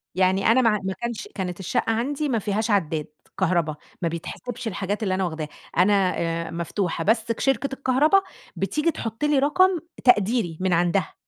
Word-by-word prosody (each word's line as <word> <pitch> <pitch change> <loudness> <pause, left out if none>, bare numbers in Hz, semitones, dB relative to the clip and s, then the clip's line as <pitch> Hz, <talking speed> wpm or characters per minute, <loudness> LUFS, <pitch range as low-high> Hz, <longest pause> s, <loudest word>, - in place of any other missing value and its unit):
يعني 190 +1 +2
أنا 230 +4 +5
ماع 220 -3 +3
ما 190 0 -2
كانش 235 +2 -5
كانت 180 -2 -4
الشقة 190 +4 0
عَندي 280 +6 -1
ما 230 -4 +1
فيهاش 210 +2 -1
عدّاد 160 -6 0 0.3
كهربا، 170 -4 +1 0.3
ما 170 - +1
بيتحسبش 230 +8 -6
الحاجات 205 +2 -2
اللي 190 - 0
أنا 190 0 0
واخداها، 160 -3 -3 0.3
أنا 190 0 +4
آآ 165 0 -2
مفتوحة، 170 0 -2
بس 225 +3 +1
ك 230 - -4
شركة 270 +1 +1
الكهربا 275 +8 +3 0.3
بتيجي 305 +2 0
تحُط 225 -1 -5
لي 295 -2 +3
رقم 365 +5 +3 0.2
تقديري 215 -7 +3
من 185 -1 +1
عندها. 175 +1 +1
205 Hz, 170 wpm, -24 LUFS, 180-245 Hz, 0.3 s, أنا